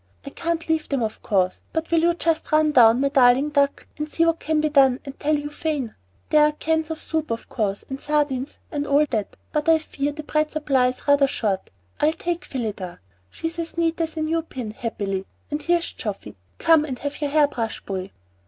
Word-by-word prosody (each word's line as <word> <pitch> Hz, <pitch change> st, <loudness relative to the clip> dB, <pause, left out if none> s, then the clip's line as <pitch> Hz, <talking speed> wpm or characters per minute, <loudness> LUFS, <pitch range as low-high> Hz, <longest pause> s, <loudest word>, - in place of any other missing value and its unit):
I 280 Hz, -, -7 dB
can't 335 Hz, +1 st, -2 dB
leave 320 Hz, -1 st, 0 dB
them 275 Hz, -4 st, 0 dB
of 220 Hz, -1 st, -4 dB
course, 185 Hz, -3 st, +1 dB
but 320 Hz, 0 st, -2 dB
will 335 Hz, -, +4 dB
you 340 Hz, +1 st, +3 dB
just 330 Hz, -2 st, 0 dB
run 310 Hz, 0 st, +4 dB
down, 240 Hz, -3 st, +6 dB
my 280 Hz, -, +2 dB
darling 265 Hz, +1 st, +5 dB
duck, 280 Hz, -1 st, +1 dB
and 300 Hz, 0 st, -3 dB
see 330 Hz, +2 st, +2 dB
what 330 Hz, 0 st, +2 dB
can 310 Hz, 0 st, 0 dB
be 305 Hz, -, +2 dB
done, 270 Hz, -3 st, +5 dB
and 275 Hz, -1 st, -9 dB
tell 305 Hz, +1 st, +2 dB
Euphane? 295 Hz, -4 st, -3 dB, 0.4 s
There 300 Hz, 0 st, +6 dB
are 300 Hz, 0 st, +3 dB
cans 320 Hz, +1 st, 0 dB
of 320 Hz, -1 st, -4 dB
soup, 315 Hz, -1 st, -2 dB
of 230 Hz, 0 st, -4 dB
course, 200 Hz, -3 st, -2 dB
and 270 Hz, 0 st, -6 dB
sardines, 290 Hz, -3 st, -1 dB
and 290 Hz, -2 st, -2 dB
all 285 Hz, +2 st, +4 dB
that, 215 Hz, -4 st, -2 dB
but 300 Hz, +2 st, 0 dB
I 325 Hz, -, +7 dB
fear 290 Hz, -2 st, -3 dB
the 305 Hz, +1 st, -7 dB
bread 305 Hz, 0 st, 0 dB
supply 275 Hz, -5 st, +2 dB
is 255 Hz, +3 st, -5 dB
rather 285 Hz, -1 st, +5 dB
short. 200 Hz, -7 st, -2 dB, 0.3 s
I'll 305 Hz, +1 st, +3 dB
take 345 Hz, +1 st, -3 dB
Phillida. 205 Hz, -8 st, -4 dB, 0.3 s
She's 325 Hz, -, -5 dB
as 335 Hz, 0 st, -5 dB
neat 330 Hz, 0 st, +1 dB
as 325 Hz, -1 st, -3 dB
a 315 Hz, -, 0 dB
new 325 Hz, +1 st, 0 dB
pin, 255 Hz, -8 st, -6 dB
happily. 205 Hz, -5 st, -3 dB, 0.3 s
Ah, -, -, +2 dB
here's 345 Hz, +1 st, +1 dB
Geoffy. -, -, -5 dB, 0.2 s
Come 325 Hz, -2 st, +5 dB
and 265 Hz, -5 st, -4 dB
have 285 Hz, +3 st, -5 dB
your 290 Hz, -, 0 dB
hair 295 Hz, 0 st, +4 dB
brushed, 230 Hz, -5 st, -4 dB
boy." 190 Hz, -1 st, -4 dB
295 Hz, 215 wpm, -23 LUFS, 250-315 Hz, 0.4 s, I